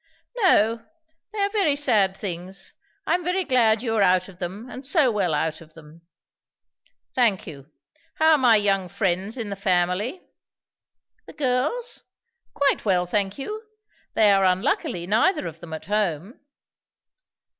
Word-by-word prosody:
"No; 230 - +3 0.5
they 430 - -9
are 400 0 +1
very 390 -9 +2
sad 215 -9 +2
things. 185 0 -6 0.3
I - - +1
am 355 0 0
very 365 +2 0
glad 235 -6 +2
you 225 -3 -1
are - - +3
out 185 -1 +3
of 185 -2 -16
them, 195 +6 -6
and 255 +1 -9
so 280 -2 +3
well 195 -5 0
out 160 +2 -2
of 155 -1 -17
them." 160 +1 -15 1.1
"Thank 230 -7 +2
you. 140 -3 -11 0.5
How 315 0 +4
are 310 - +6
my 245 -4 +5
young 195 -3 +1
friends 195 +4 -2
in 220 -4 -4
the - - -3
family?" 190 - 0 1.1
"The - - -11
girls? 295 - -1 0.5
Quite 280 -1 +1
well, 185 -4 +2
thank 195 +2 -1
you, 425 +10 -5 0.5
They 215 -2 +5
are 195 -1 +3
unluckily 190 - 0
neither 290 - +2
of 165 0 -7
them 165 -1 -11
at 160 0 -7
home." 200 - -2
210 Hz, 155 wpm, -24 LUFS, 180-265 Hz, 1.1 s, are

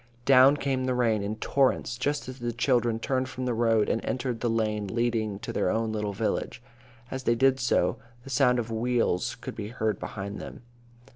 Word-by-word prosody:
Down 135 +2 +7
came 135 -2 -1
the 130 -1 0
rain 115 -4 +2
in 100 +2 -3
torrents, 130 0 +1
just 145 +4 -2
as 130 0 -8
the 120 0 -2
children 120 -1 +1
turned 130 +2 -1
from 130 -1 -5
the 125 - 0
road 115 -2 +2
and 115 - -1
entered 125 -2 -2
the 120 - 0
lane 105 -2 0
leading 110 -1 -1
to - - -6
their - - +1
own 110 +2 0
little 105 -1 -2
village. 100 - -2 0.5
As 130 -1 -5
they 120 - +3
did 130 +2 +3
so, 125 - +1 0.3
the 135 - -9
sound 125 -1 +3
of 115 -1 -3
wheels 115 -5 0
could - - -7
be 105 -2 -5
heard 110 -1 -2
behind 100 0 -6
them. - - -9
120 Hz, 200 wpm, -27 LUFS, 110-130 Hz, 0.5 s, Down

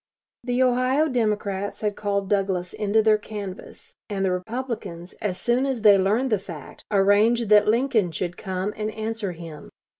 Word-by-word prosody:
The 245 +1 +1
Ohio 255 +4 +2
Democrats 210 -6 -1
had 210 -1 -1
called 200 -1 -2
Douglas 190 -3 -1
into 215 +1 +1
their 215 -1 +4
canvass, 205 -3 -8 0.2
and 195 -2 -1
the 185 - +1
Republicans, 185 -3 -5
as 185 -3 -2
soon 240 +4 +1
as 255 -5 -2
they 205 -2 +8
learned 220 +7 +1
the 210 - +2
fact, 170 -6 -10
arranged 210 +3 +3
that 210 0 +6
Lincoln 225 -5 +2
should 175 +2 -3
come 190 +3 -3
and 215 0 -3
answer 220 -2 -4
him. 165 -3 -10
210 Hz, 160 wpm, -24 LUFS, 190-230 Hz, 0.2 s, they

